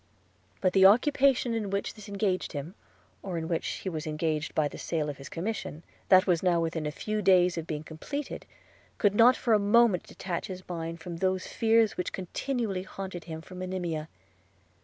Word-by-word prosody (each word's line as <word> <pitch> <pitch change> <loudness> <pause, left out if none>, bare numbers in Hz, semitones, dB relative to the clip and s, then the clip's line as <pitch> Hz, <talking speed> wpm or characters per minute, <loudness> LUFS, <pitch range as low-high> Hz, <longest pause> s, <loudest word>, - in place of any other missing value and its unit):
But 185 -2 +2
the 190 -1 +8
occupation 255 +2 +3
in 220 -3 -2
which 200 +1 -2
this 215 -2 -12
engaged 195 -3 -1
him, 145 +4 -5 0.5
or 185 -3 -4
in 160 -1 -3
which 165 -1 -1
he - - -5
was 160 -3 -3
engaged 155 0 -2
by 155 -2 +3
the - - -9
sale 155 -3 -1
of 140 - -11
his 135 - -9
commission, 175 -3 -4 0.3
that 185 +1 +7
was 175 -4 +2
now 180 -2 +3
within 160 -2 -2
a - - -2
few 215 +7 -3
days 180 -2 +4
of 165 -1 -5
being 150 -1 -4
completed, 265 - -6 0.5
could 205 -3 +3
not 235 +4 +6
for 235 - +1
a 215 - +5
moment 205 -2 +4
detach 175 -3 -4
his 185 -1 -8
mind 165 -1 -5
from 170 0 -6
those 185 +1 0
fears 225 -1 +2
which 180 - -3
continually 200 +1 -2
haunted 190 -2 -7
him 160 -1 -6
for 175 - -13
Monimia. 180 -4 -4
185 Hz, 190 wpm, -29 LUFS, 165-205 Hz, 0.5 s, the